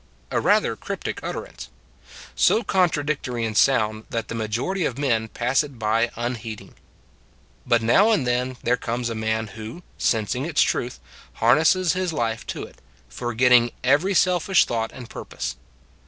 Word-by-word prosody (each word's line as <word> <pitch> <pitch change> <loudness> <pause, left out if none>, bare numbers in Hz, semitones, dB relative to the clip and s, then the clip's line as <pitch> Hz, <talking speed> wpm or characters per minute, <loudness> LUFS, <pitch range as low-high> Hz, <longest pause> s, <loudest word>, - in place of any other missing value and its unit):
A - - +1
rather - - +3
cryptic - - -5
utterance; - - -6 0.6
so 225 - +3
contra 175 -6 +1
dictory 125 -6 -2
in 110 - -3
sound 110 -2 +2
that 115 -1 -3
the - - -4
majority 115 - -2
of 125 - -2
men 115 -6 0
pass 125 +6 +1
it 140 -4 -10
by 115 +1 +1
unheeding. 115 -2 -5 0.9
But 120 -2 +3
now 195 - +5
and 185 - +2
then 125 +1 -1
there 125 +1 +2
comes 120 0 -3
a - - -3
man 110 0 -2
who, 110 - -9 0.2
sensing 115 +4 0
its 160 -3 +3
truth, 120 - -2 0.3
harnesses 160 +9 +3
his 185 -1 -1
life 115 -5 -2
to - - -4
it, - - -13 0.3
forgetting 120 0 +3
every 150 +10 +3
selfish 180 +1 +3
thought 115 -1 -2
and 125 -2 -10
purpose. - - -6
120 Hz, 155 wpm, -23 LUFS, 115-150 Hz, 0.9 s, now